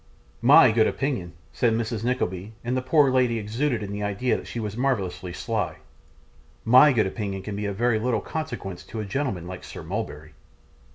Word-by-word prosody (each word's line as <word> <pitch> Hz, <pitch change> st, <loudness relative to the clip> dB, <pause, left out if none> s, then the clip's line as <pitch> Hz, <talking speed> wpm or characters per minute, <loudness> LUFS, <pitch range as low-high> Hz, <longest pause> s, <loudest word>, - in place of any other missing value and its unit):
'MY -, -, +7 dB
good 110 Hz, 0 st, +4 dB
opinion,' 125 Hz, -12 st, -2 dB, 0.2 s
said 120 Hz, -2 st, +2 dB
Mrs. 115 Hz, -1 st, -2 dB
Nickleby, 110 Hz, -5 st, -2 dB
and 120 Hz, +2 st, -1 dB
the 130 Hz, -, 0 dB
poor 135 Hz, +1 st, +4 dB
lady 125 Hz, -3 st, +2 dB
exulted 115 Hz, +3 st, -1 dB
in 100 Hz, -, -5 dB
the 100 Hz, 0 st, -4 dB
idea 105 Hz, +5 st, 0 dB
that -, -, -6 dB
she 120 Hz, -, -5 dB
was 105 Hz, -2 st, -4 dB
marvellously 100 Hz, -8 st, -1 dB
sly, 105 Hz, -1 st, -2 dB, 0.9 s
'my 130 Hz, +6 st, +7 dB
good 115 Hz, -6 st, +2 dB
opinion 95 Hz, -1 st, -4 dB
can 105 Hz, 0 st, -5 dB
be 105 Hz, 0 st, -3 dB
of 100 Hz, -, -3 dB
very 120 Hz, +1 st, +2 dB
little 115 Hz, -1 st, 0 dB
consequence 100 Hz, -, -5 dB
to 110 Hz, -, -7 dB
a 105 Hz, -, -3 dB
gentleman 100 Hz, -, -2 dB
like 90 Hz, +1 st, -8 dB
Sir 90 Hz, -, -9 dB
Mulberry. 80 Hz, -5 st, -5 dB
110 Hz, 185 wpm, -25 LUFS, 95-125 Hz, 0.9 s, MY